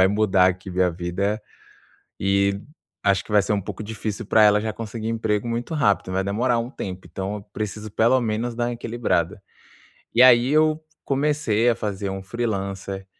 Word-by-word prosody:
vai 95 - +6
mudar 100 -2 +3
aqui 95 +1 -2
minha 90 0 +2
vida, 90 +5 -2 0.8
e 100 0 +1 0.4
acho 100 -2 +2
que - - -15
vai 105 -1 +5
ser 105 - -1
um 100 - +1
pouco 100 - -7
difícil 110 0 -5
pra 110 +1 +5
ela 105 0 +6
já 110 0 -2
conseguir 110 0 -5
emprego 110 -1 -1
muito 120 +7 -3
rápido, 100 -9 +1
vai 95 +1 0
demorar 120 +5 +1
um 115 +1 -3
tempo, 95 -8 -7
então, 95 +2 -4
eu 105 - -8
preciso 105 0 -5
pelo 115 +5 +3
menos 115 +1 -2
dar 120 +1 -1
uma 120 - -2
equilibrada. 110 -5 -1 0.7
E 120 - +6
aí 125 -1 +7
eu 155 +1 +3 0.2
comecei 135 -5 +1
a 115 - +2
fazer 100 -2 -3
um 95 0 -5
freelancer, 95 -3 -4
105 Hz, 180 wpm, -23 LUFS, 95-115 Hz, 0.8 s, aí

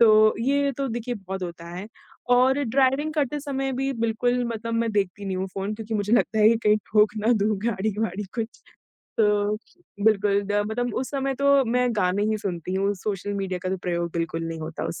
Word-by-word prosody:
तो 215 -1 +6
ये 280 +3 +2
तो 275 - 0
देखिए 240 +1 -3
बहुत 190 -3 -6
होता 170 -1 -6
है 190 +3 -6 0.5
और 265 +3 +4
ड्राइविंग 270 +5 +2
करते 295 -1 0
समय 270 -2 -2
भी 270 +2 -1
बिल्कुल 245 +1 0
मतलब 230 +1 -4
मैं 230 0 +1
देखती 200 0 -1
नहीं 190 -1 -2
हूँ 190 - -2
फ़ोन 200 +2 -2
क्योंकि 220 0 -5
मुझे 210 +1 -1
लगता 225 -2 +3
है 215 0 +7
कि 230 - +4
कहीं 210 0 +5 0.2
ठोक 210 0 +4
ना 240 - +6
दूँ 215 0 +2
गाड़ी-वाड़ी 210 -1 -1
कुछ। 230 0 -5 0.6
तो, 210 -1 +3 0.5
बिल्कुल 205 -2 +3
द 205 +1 +1
मतलब 245 0 -2
उस 255 - -2
समय 275 -1 -1
तो 280 0 +4
मैं 250 +1 +2
गाने 190 +1 +1
ही 215 - 0
सुनती 185 -2 -4
हूँ, 195 +1 +1
सोशल 200 +1 -3
मीडिया 190 -2 -2
का 185 - -2
तो 190 - 0
प्रयोग 170 -1 -1
बिल्कुल 165 -1 -2
नहीं 165 -1 -5
होता 160 +1 -5
उस - - -5
215 Hz, 205 wpm, -25 LUFS, 195-245 Hz, 0.6 s, है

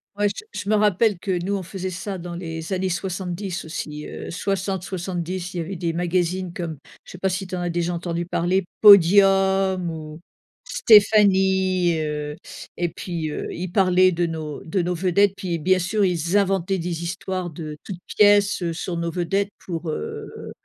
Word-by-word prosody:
Ouais, 205 0 +2
je 205 - -7 0.2
je 200 - -6
me 215 - +4
rappelle 210 -1 +3
que 180 -1 -2
nous, 200 +2 -1
on 190 - -3
faisait 185 +1 -5
ça 190 +1 -5
dans 175 0 -7
les 165 -1 -6
années 190 0 0
70 185 0 -4
aussi, 150 -2 -6
heu, - - -7
60-70, 185 -1 -3
il - - -3
y - - -1
avait 175 +4 -4
des 170 -1 -2
magazines 175 +1 -1
comme 170 -5 -5 0.3
je - - -13
sais 180 - -8
pas 190 +1 0
si 190 +1 -3
tu 185 - -5
en 180 - -3
as 175 -1 -1
déjà 175 0 -1
entendu 170 0 -3
parler, 180 +2 +1 0.2
Podium 195 -1 +6
ou 155 -1 -7 0.5
Stéphanie, 190 - +4
heu 150 -1 -3 0.4
et 175 -1 0
puis, 165 -2 -4
heu, - - -4
il 175 +1 -5
parlait 185 -1 +4
de 175 0 0
nos 155 -3 -5
de 175 +2 0
nos 180 +1 -1
vedettes 190 +3 +2
puis, 180 -3 -3
bien 185 +4 +2
sûr, 195 +3 +1
ils 175 +2 +1
inventaient 195 -1 +1
des 170 -1 -3
histoires 185 0 -3
de 155 -1 -7
toutes 185 -4 -7
pièces, 205 -2 +4
heu, 170 -1 -1
sur 170 +1 -4
nos 170 0 -2
vedettes 195 +4 -1 0.2
pour, 165 -2 -4
heu 75 - -6
180 Hz, 185 wpm, -23 LUFS, 170-195 Hz, 0.5 s, Podium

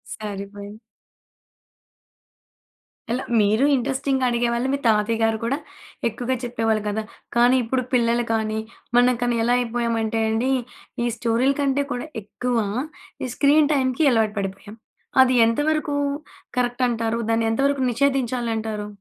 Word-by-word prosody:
సరిపోయింది. 205 0 -7 2.3
ఎలా, 250 +2 -1 0.2
మీరూ 215 +6 +3
ఇంట్రెస్టింగ్‌గా 265 +1 0
అడిగేవాళ్ళు, 235 +1 0
మీ - - +1
తాతయ్య 220 +1 +2
గారు 225 0 +2
కూడా 270 +5 0 0.5
ఎక్కువగా 245 +3 -2
చెప్పేవాళ్ళు 225 -3 0
గదా! 215 +1 -1 0.3
కానీ 245 +2 +5
ఇప్పుడు 255 +3 -1
పిల్లలు 235 0 +2
కానీ, 220 -1 -1 0.4
మనం 245 0 +5
కానీ, 240 -1 +1
ఎలా 240 +1 +2
అయిపోయామంటే 230 -2 -1
అండి, 235 +4 +1 0.5
ఈ - - +1
స్టోరీ‌ల 240 +4 +2
కంటే 280 0 +1
కూడా 245 +5 -5 0.2
ఎక్కువ, 245 +3 -2 0.7
ఈ - - -1
స్క్రీన్ 295 +1 +4
టైమ్‌కి 260 +2 +1
అలవాటు 220 -3 +1
పడిపోయాం. 200 +2 -6 0.5
అది 255 - +2
ఎంత 230 +4 0
వరకూ 305 -2 0 0.6
కరక్ట్ 245 +1 0
అంటారు? 230 -1 -1
దాన్ని 225 0 +1
ఎంత 225 - -2
వరకు 280 -2 0
నిషేధించాలంటారు? 235 -5 -1
235 Hz, 125 wpm, -23 LUFS, 220-260 Hz, 2.3 s, కానీ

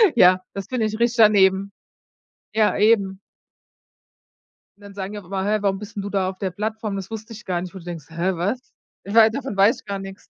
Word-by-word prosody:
Ja, 185 -4 +6
das 195 -1 -6
finde 245 -4 -1
ich 215 +1 -3
richtig 235 +1 +1
daneben. 200 -3 +5 0.8
Ja, 215 -1 +3
eben. 200 -3 +3 1.6
Und - - -25
dann 200 0 -11
sagen 195 0 -5
die 210 - -5
auch 200 - -15
immer: 190 +1 -3
„Hä, 210 +2 +2
warum 195 -1 0
bist 210 +1 -10
'n - - -1
du 205 - -4
da 190 -2 0
auf 190 - -8
der 190 -1 -3
Plattform? 215 +2 -3
Das 195 -1 -6
wusste 225 +1 -7
ich 220 +2 -11
gar 175 -2 -1
nicht.“ 180 +1 -7
Wo 190 - -8
du - - -14
denkst: 170 -4 -7
„Hä, 170 +3 -1
was? 200 +9 -1 0.5
Wei 220 +2 +6
davon 270 -2 -5
weiß 200 +4 +5
ich - - -20
gar 200 -1 -3
nix.“ 195 0 -10
200 Hz, 225 wpm, -22 LUFS, 190-220 Hz, 1.6 s, Ja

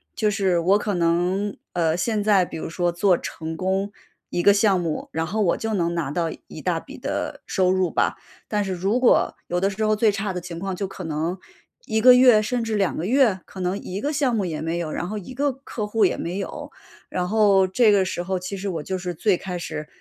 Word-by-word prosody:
就 210 -1 +1
是 195 -3 +1
我 190 +5 +3
可 205 -1 -2
能， 175 +4 +1 0.2
呃， 165 -2 +1
现 210 +4 0
在 200 -3 +4
比 175 - -6
如 - - -5
说 175 0 0
做 180 +1 +3
成 160 -1 -6
功 190 +3 -1 0.4
一 175 - 0
个 200 - +6
项 200 -2 +3
目， 165 -3 -3
然 160 +1 -2
后 215 +5 -1
我 175 - +2
就 220 -1 -2
能 170 -2 0
拿 165 -5 -2
到 165 +1 -1 0.2
一 - - -9
大 - - -1
笔 - - -12
的， - - -4
收 185 -2 +1
入 185 -2 +1
吧。 - - +1 0.3
但 210 -2 0
是 190 - -2
如 195 +7 0
果 250 - +3
有 175 0 -2
的 195 - +2
时 205 +2 -3
候 215 0 +3
最 215 0 +3
差 200 -1 -3
的 180 - -4
情 170 -1 -7
况， 190 +2 -3
就 195 +1 -3
可 185 - -8
能 160 +3 -2 0.5
1 220 - 0
个 250 +2 +9
月 250 -4 +7
甚 235 +2 -1
至 225 -1 -3
2 195 -4 0
个 165 - -2
月， 235 -3 +3
可 190 - -11
能 180 +2 -1
一 190 +1 -5
个 290 - -1
项 275 -5 +1
目 210 - 0
也 160 -3 -3
没 165 +1 -2
有， 160 -3 -3
然 175 - -3
后 215 +3 -4
一 205 +7 -10
个 285 +2 +1
客 255 -4 -6
户 210 +1 +1
也 180 - +1
没 175 +4 -3
有。 195 - -6 0.4
然 180 -1 -2
后 200 -3 +4
这 215 +4 +4
个 200 -2 +4
时 180 -1 -3
候 190 0 -2
其 180 +2 -5
实 195 +1 -4
我 165 -4 -3
就 190 +3 -3
是 180 -1 -4
最 185 +2 +1
开 180 -2 -5
始 155 -2 -5
190 Hz, 260 characters per minute, -23 LUFS, 175-210 Hz, 0.5 s, 个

